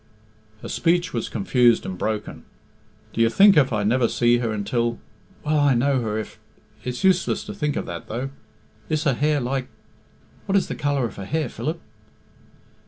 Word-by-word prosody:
Her - - -5
speech 175 +1 +1
was 115 - -2
confused 120 +2 +3
and 95 - -4
broken. 105 +3 -4 0.7
"Do 115 - 0
you 115 - +5
think 195 - +6
if 140 -4 +4
I 105 -2 0
never 120 +3 +2
see 120 +1 +2
her 115 -2 -1
until... 115 +3 -1 0.5
Will 150 0 +2
I 145 -3 +4
know 130 +2 +2
her 110 -2 -2
if... 110 - -6 0.4
It's 125 -1 -4
useless 190 -1 +2
to - - -7
think 150 -7 -2
of - - -2
that, 85 -1 -7
though. 125 +5 -4 0.6
Is 155 0 0
her 145 -4 +2
hair 150 +3 +1
like... 130 0 -2 0.8
What 195 - +1
is 195 - +2
the - - -2
colour 145 -3 0
of 115 - -7
her 100 - -6
hair, 155 +8 -1
Philip?" 160 +3 -4
125 Hz, 180 wpm, -23 LUFS, 115-150 Hz, 0.8 s, think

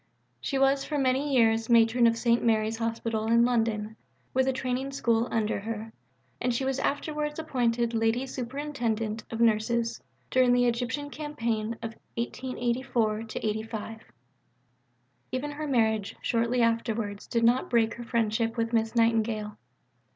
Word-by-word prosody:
She 275 - -2
was 270 0 +3
for 300 - -3
many 270 +2 +1
years 225 -3 +3
Matron 235 +1 +5
of 230 0 +2
St. 235 0 +2
Mary's 220 -1 +2
Hospital 225 -1 -2
in 235 +1 +5
London, 225 -3 0 0.4
with 260 0 +2
a - - +4
Training 260 +1 -2
School 235 -3 +1
under 220 -3 0
her, 220 +1 -6 0.5
and 250 - +1
she 245 +3 -1
was 270 0 -1
afterwards 300 +1 -2
appointed 240 -6 0
Lady 225 +3 +1
Superintendent 240 -5 -3
of 225 - -5
Nurses 230 +1 +1 0.3
during 255 -1 +4
the 245 0 +4
Egyptian 245 +4 -1
campaign 230 -7 -2
of 225 0 -4 0.2
1884 240 -2 -1
85. 220 +1 -3 1.3
Even 265 +4 -2
her 300 +1 -5
marriage 220 -6 +1
shortly 235 +1 +1
afterwards 230 -3 -1
did 230 -1 0
not 240 +3 +3
break 230 -2 +2
her 240 - -8
friendship 230 0 0
with 230 0 -1
Miss 225 0 +1
Nightingale. 225 -2 +1
235 Hz, 140 wpm, -28 LUFS, 225-255 Hz, 1.3 s, Matron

